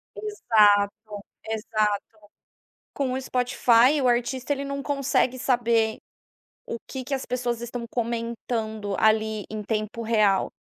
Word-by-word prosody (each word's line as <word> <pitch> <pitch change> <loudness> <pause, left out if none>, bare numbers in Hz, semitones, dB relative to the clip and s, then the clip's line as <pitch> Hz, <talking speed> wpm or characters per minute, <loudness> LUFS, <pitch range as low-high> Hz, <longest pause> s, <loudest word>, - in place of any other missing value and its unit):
Exato, 210 - +3 0.5
exato, 215 -2 0 1.0
com 265 -3 -1
o 260 - -2
Spotify, 250 +2 +3
o 255 - +2
artista, 245 +3 0
ele 280 - -4
não 280 0 -4
consegue 270 -2 +1
saber 235 -3 +2 0.7
o 230 - -4
que 265 -1 -5
que 275 - -5
as 265 - -2
pessoas 240 -2 -2
estão 240 0 -5
comentando 230 -3 -3
ali 220 -1 +2
em 215 -1 -5
tempo 215 +1 -3
real. 215 -4 +2
235 Hz, 125 wpm, -25 LUFS, 220-255 Hz, 1.0 s, Exato